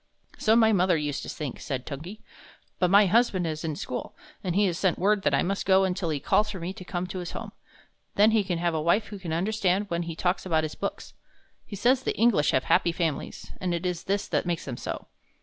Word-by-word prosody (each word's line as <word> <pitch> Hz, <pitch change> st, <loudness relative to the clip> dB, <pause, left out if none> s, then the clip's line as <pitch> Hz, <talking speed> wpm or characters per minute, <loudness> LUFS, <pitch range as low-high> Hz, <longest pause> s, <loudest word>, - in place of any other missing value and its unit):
"So 220 Hz, +1 st, +4 dB
my 220 Hz, -1 st, +5 dB
mother 180 Hz, -3 st, +3 dB
used 145 Hz, -2 st, -2 dB
to -, -, -7 dB
think," 145 Hz, -5 st, -5 dB
said 130 Hz, -4 st, -4 dB
Tungi; 160 Hz, +9 st, -7 dB, 0.6 s
"but 180 Hz, -, +3 dB
my 200 Hz, +2 st, +7 dB
husband 195 Hz, -3 st, +2 dB
is 155 Hz, 0 st, -3 dB
in 155 Hz, -2 st, -2 dB
school, 125 Hz, -, -5 dB, 0.3 s
and 180 Hz, -3 st, -2 dB
he 205 Hz, +1 st, +4 dB
has 175 Hz, -3 st, -1 dB
sent 185 Hz, -3 st, +2 dB
word 205 Hz, +2 st, +2 dB
that -, -, +2 dB
I -, -, +2 dB
must 195 Hz, +2 st, -1 dB
go 190 Hz, 0 st, +5 dB
until 180 Hz, -2 st, -1 dB
he 150 Hz, -2 st, -1 dB
calls 210 Hz, +9 st, +2 dB
for 195 Hz, -3 st, -5 dB
me 175 Hz, +3 st, -4 dB
to 195 Hz, -2 st, -10 dB
come 180 Hz, -1 st, -3 dB
to 185 Hz, +1 st, -5 dB
his 175 Hz, -1 st, -6 dB
home. -, -, -6 dB, 0.6 s
Then 210 Hz, +2 st, +5 dB
he 220 Hz, -2 st, +3 dB
can 180 Hz, -3 st, -2 dB
have 170 Hz, 0 st, 0 dB
a 160 Hz, -, -1 dB
wife 170 Hz, +7 st, +2 dB
who 205 Hz, -1 st, -7 dB
can 175 Hz, -3 st, -6 dB
understand 195 Hz, +2 st, 0 dB
when 170 Hz, 0 st, 0 dB
he 165 Hz, -1 st, -5 dB
talks 180 Hz, +3 st, 0 dB
about 160 Hz, -4 st, +1 dB
his 155 Hz, -, -3 dB
books. -, -, -5 dB, 0.5 s
He 205 Hz, -, -7 dB
says 245 Hz, +6 st, +3 dB
the -, -, -2 dB
English 220 Hz, -11 st, +3 dB
have 130 Hz, -, +2 dB
happy 170 Hz, -, +3 dB
families, 165 Hz, -3 st, -3 dB
and 180 Hz, -2 st, 0 dB
it 170 Hz, +2 st, -4 dB
is 180 Hz, -2 st, -2 dB
this 200 Hz, +1 st, -1 dB
that -, -, 0 dB
makes 170 Hz, -2 st, -2 dB
them 130 Hz, -, -4 dB
so. -, -, -5 dB
180 Hz, 245 wpm, -27 LUFS, 165-200 Hz, 0.6 s, my